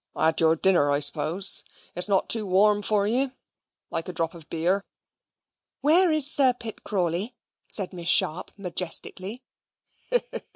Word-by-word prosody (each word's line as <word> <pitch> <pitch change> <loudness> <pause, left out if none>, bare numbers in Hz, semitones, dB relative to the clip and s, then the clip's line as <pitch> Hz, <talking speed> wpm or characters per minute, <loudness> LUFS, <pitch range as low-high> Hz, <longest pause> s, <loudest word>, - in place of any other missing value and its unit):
"Had 160 +1 +1
your 160 0 +3
dinner, 170 -4 +1
I 145 0 0
suppose? 165 +6 +4 0.3
It - - -9
is 180 - +1
not 195 -2 0
too 220 -3 0
warm 205 +3 +2
for 205 0 0
you? 255 +5 -1 0.6
Like 165 - -4
a - - -5
drop 165 -1 -3
of 165 -3 -15
beer?" 180 +5 -1 1.0
"Where 335 +4 +3
is 310 -3 +3
Sir 275 -3 +2
Pitt 225 -2 -9
Crawley?" 190 +4 -3 0.3
said 195 -2 0
Miss 170 -1 -3
Sharp 160 0 +3
majestically. 185 +4 -2
190 Hz, 150 wpm, -24 LUFS, 170-220 Hz, 1.0 s, suppose